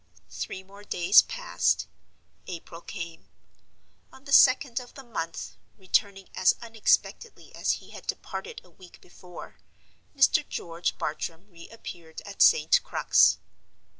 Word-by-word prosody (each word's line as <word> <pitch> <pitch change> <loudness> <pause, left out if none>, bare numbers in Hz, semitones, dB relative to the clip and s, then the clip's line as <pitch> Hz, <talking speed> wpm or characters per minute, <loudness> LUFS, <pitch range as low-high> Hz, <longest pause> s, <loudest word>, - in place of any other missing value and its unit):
Three 190 - -6
more 200 +2 -15
days 185 0 +5
passed—April 175 - -4
came. 170 -3 -8 0.8
On 265 - -17
the 280 - -10
second 260 -2 +5
of 245 -1 -13
the 270 - -10
month 165 - -6 0.2
—returning 195 0 0
as 185 - +3
unexpectedly 230 - -1
as - - 0
he - - -9
had - - -12
departed 455 0 -5
a - - -21
week 185 -2 -17
before—Mr. 185 - -3
George 170 0 -3
Bartram 165 +3 -4
re 170 -1 -13
appeared 170 -7 -10
at 200 -1 -7
St. 480 +1 +5
Crux. - - +3
195 Hz, 120 wpm, -27 LUFS, 170-255 Hz, 0.8 s, days